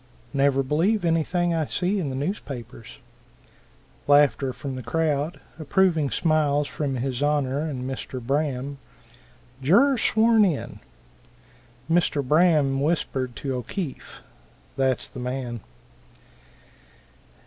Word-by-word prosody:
"Never 135 Hz, -1 st, +2 dB
believe 175 Hz, +9 st, +1 dB
anything 170 Hz, +1 st, +1 dB
I 160 Hz, -3 st, 0 dB
see 190 Hz, +3 st, 0 dB
in 155 Hz, -7 st, -2 dB
the 130 Hz, -, -4 dB
newspapers." 130 Hz, -, -6 dB, 1.1 s
(Laughter 145 Hz, -2 st, +4 dB
from 135 Hz, +1 st, -6 dB
the 130 Hz, -, -5 dB
crowd, 150 Hz, +4 st, -1 dB, 0.2 s
approving 160 Hz, -1 st, +2 dB
smiles 150 Hz, -3 st, +1 dB
from 140 Hz, -3 st, -3 dB
his 125 Hz, 0 st, -3 dB
Honor 145 Hz, -2 st, +1 dB
and 145 Hz, -5 st, -3 dB
Mr. 130 Hz, -1 st, -5 dB
Braham.) 140 Hz, +1 st, -2 dB, 0.8 s
Juror 235 Hz, -, +4 dB
sworn 220 Hz, 0 st, +4 dB
in. 175 Hz, -8 st, -1 dB, 1.1 s
Mr. 160 Hz, -5 st, +1 dB
Braham 150 Hz, -4 st, +3 dB
whispered 135 Hz, -5 st, -1 dB
to 135 Hz, -2 st, -3 dB
O'Keefe, 135 Hz, -, -6 dB, 0.5 s
"that's 130 Hz, -2 st, 0 dB
the -, -, -10 dB
man." 125 Hz, -1 st, -4 dB
145 Hz, 105 wpm, -24 LUFS, 130-165 Hz, 1.1 s, Laughter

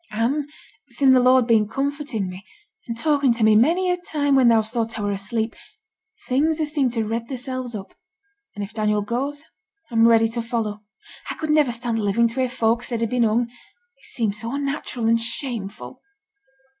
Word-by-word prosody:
'And 255 Hz, +7 st, -1 dB, 0.4 s
sin' 260 Hz, +1 st, +3 dB
the 255 Hz, -, +6 dB
Lord 255 Hz, +1 st, +5 dB
has -, -, -8 dB
been 220 Hz, -2 st, +4 dB
comforting 275 Hz, -4 st, -3 dB
me, 185 Hz, +2 st, -8 dB, 0.4 s
and 230 Hz, -1 st, -4 dB
talking 285 Hz, -1 st, +2 dB
to 230 Hz, -1 st, -2 dB
me 215 Hz, 0 st, +5 dB
many 345 Hz, +11 st, +3 dB
a 360 Hz, -, 0 dB
time 290 Hz, -5 st, 0 dB
when 260 Hz, -2 st, +5 dB
thou's 220 Hz, -2 st, +3 dB
thought 230 Hz, -2 st, -2 dB
I 210 Hz, -, -3 dB
were 205 Hz, -, 0 dB
asleep, 220 Hz, +3 st, -3 dB, 0.7 s
things 300 Hz, +5 st, +1 dB
has 305 Hz, -2 st, -2 dB
seemed 270 Hz, -6 st, +1 dB
to 225 Hz, -2 st, -1 dB
redd 230 Hz, +2 st, -3 dB
theirselves 255 Hz, -2 st, -4 dB
up, 195 Hz, -2 st, -8 dB, 0.6 s
and 205 Hz, -, -4 dB
if 200 Hz, +2 st, -8 dB
Daniel 210 Hz, -1 st, 0 dB
goes, 275 Hz, +7 st, -3 dB, 0.5 s
I'm 230 Hz, 0 st, +5 dB
ready 225 Hz, -1 st, +5 dB
to 235 Hz, +1 st, -3 dB
follow. 225 Hz, -3 st, -3 dB, 0.5 s
I -, -, -3 dB
could 310 Hz, -1 st, -2 dB
niver 300 Hz, -5 st, +3 dB
stand 235 Hz, -1 st, -2 dB
living 215 Hz, +3 st, +2 dB
to 230 Hz, -, -5 dB
hear 255 Hz, -1 st, +1 dB
folks 235 Hz, 0 st, 0 dB
say 240 Hz, -, -2 dB
he'd 230 Hz, -1 st, -2 dB
been 250 Hz, -1 st, +1 dB
hung; 230 Hz, +1 st, +3 dB
it 465 Hz, -, -17 dB
seems 215 Hz, -3 st, -2 dB
so 230 Hz, +1 st, -5 dB
unnatural 275 Hz, -4 st, -3 dB
and 230 Hz, 0 st, +3 dB
shameful.' 225 Hz, -, -3 dB
235 Hz, 195 wpm, -22 LUFS, 225-275 Hz, 0.7 s, the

